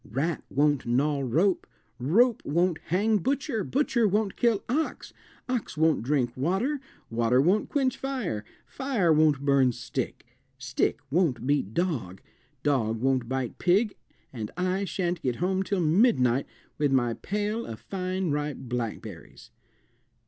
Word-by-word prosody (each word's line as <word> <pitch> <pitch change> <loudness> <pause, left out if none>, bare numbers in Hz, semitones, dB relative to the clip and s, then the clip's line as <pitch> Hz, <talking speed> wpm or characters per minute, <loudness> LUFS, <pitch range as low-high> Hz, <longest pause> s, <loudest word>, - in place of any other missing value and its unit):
"Rat 145 +9 -1
won't 145 -2 +1
gnaw 140 +4 +2
rope, 170 - +1 0.3
rope 215 - +3
won't 170 +2 +1
hang 210 +5 +2
butcher, 265 - -1
butcher 245 -3 +1
won't 205 0 0
kill 230 -4 +2
ox, 305 +7 -2 0.3
ox 250 -10 -3
won't 160 0 +3
drink 125 -1 0
water, 195 - 0 0.3
water 120 +2 +2
won't 185 +9 +2
quench 270 -3 +1
fire, 250 - -3 0.2
fire 240 - +1
won't 150 -3 +3
burn 135 -2 +4
stick, 120 +2 -5 0.3
stick 135 +2 -1
won't 140 -8 +1
beat 135 -7 0
dog, 135 - -1 0.4
dog 115 -6 +1
won't 130 -1 +1
bite 130 -2 -3
pig, 200 +4 +3 0.4
and 110 -4 -5
I 185 +2 0
shan't 175 -1 -2
get 125 -2 -1
home 190 +4 0
till 195 -1 -1
midnight 155 - +3 0.3
with 145 -2 +2
my 120 -3 +2
pail 210 - -3
of 110 - -7
fine 185 -2 -2
ripe 145 -1 -2
blackberries." 120 -3 -6
160 Hz, 135 wpm, -27 LUFS, 130-200 Hz, 0.4 s, burn